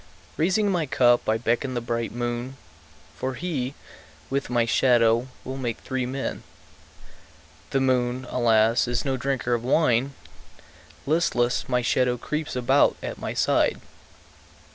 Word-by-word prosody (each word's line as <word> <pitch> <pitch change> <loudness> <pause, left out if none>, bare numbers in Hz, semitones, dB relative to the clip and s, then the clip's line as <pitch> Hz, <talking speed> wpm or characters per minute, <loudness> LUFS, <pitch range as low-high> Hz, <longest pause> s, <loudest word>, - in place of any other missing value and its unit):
Raising 195 +5 +1
my 170 -5 0
cup 120 -3 +3
I 110 - +3
beckon 120 +3 -1
the - - 0
bright 115 -1 -3
moon, 120 +2 -4 0.6
For 130 0 -3
he, 135 -3 -3 0.6
with 140 0 -1
my 120 -1 +2
shadow, 120 -1 +3 0.2
will 130 +1 -5
make 120 -4 -3
three 130 -1 -3
men. 130 +1 -4 1.3
The 135 - 0
moon, 125 -1 +1
alas, 115 0 +3
is 120 +2 -1
no 135 -1 0
drinker 130 -2 -1
of 120 -1 -1
wine; 135 -1 +2 0.9
Listless, 130 -7 +1
my 125 -1 +1
shadow 125 +1 +1
creeps 150 +4 -4
about 125 -1 +3
at - - -5
my - - -4
side. - - +2
125 Hz, 135 wpm, -25 LUFS, 120-135 Hz, 1.3 s, cup